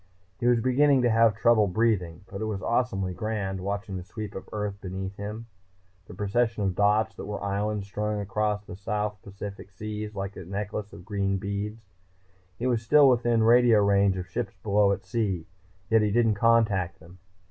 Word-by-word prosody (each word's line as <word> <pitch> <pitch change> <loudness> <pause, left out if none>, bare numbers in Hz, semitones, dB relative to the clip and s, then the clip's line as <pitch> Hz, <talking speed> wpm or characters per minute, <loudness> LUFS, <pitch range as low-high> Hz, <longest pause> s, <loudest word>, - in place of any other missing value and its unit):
He 120 - 0
was 120 -1 +4
beginning 130 +2 +3
to 120 - +3
have 115 -1 +4
trouble 115 -2 +4
breathing. 90 -4 0
But 100 +1 -8
it - - -1
was 100 -3 -3
awesomely 105 -7 0
grand, 95 -2 -3
watching 100 0 -3
the 90 - -6
sweep 105 +2 -7
of 95 - -8
Earth 105 -1 -4
beneath 95 +1 -5
him, 105 +3 -6 0.6
the - - -10
procession 110 +2 0
of 95 -2 +1
dots 105 +3 +2
that - - -6
were 105 -1 -5
islands 100 +1 -1
strung 105 +1 -2
across 105 +1 -1
the - - -9 0.5
Pacific 100 0 -8
South 95 - -33
Seas 105 0 -5
like 100 0 -4
a - - -7
necklace 100 +3 -4
of 85 - -12
green 100 -2 -1
beads. 100 +3 -4 0.7
He 120 - -4
was 120 -3 +1
still 145 +5 +6
within 120 -2 +2
radio 120 -1 +6
range 100 -1 +3
of 90 - -4
ships 100 +2 -4
below 100 -1 +3
at 100 - -3
sea. 100 -8 -1 0.5
Yet 110 -1 +5
he 105 - +2
didn't 115 +1 +3
contact 105 -5 +2
them. 85 +3 -16
105 Hz, 185 wpm, -27 LUFS, 100-115 Hz, 0.7 s, still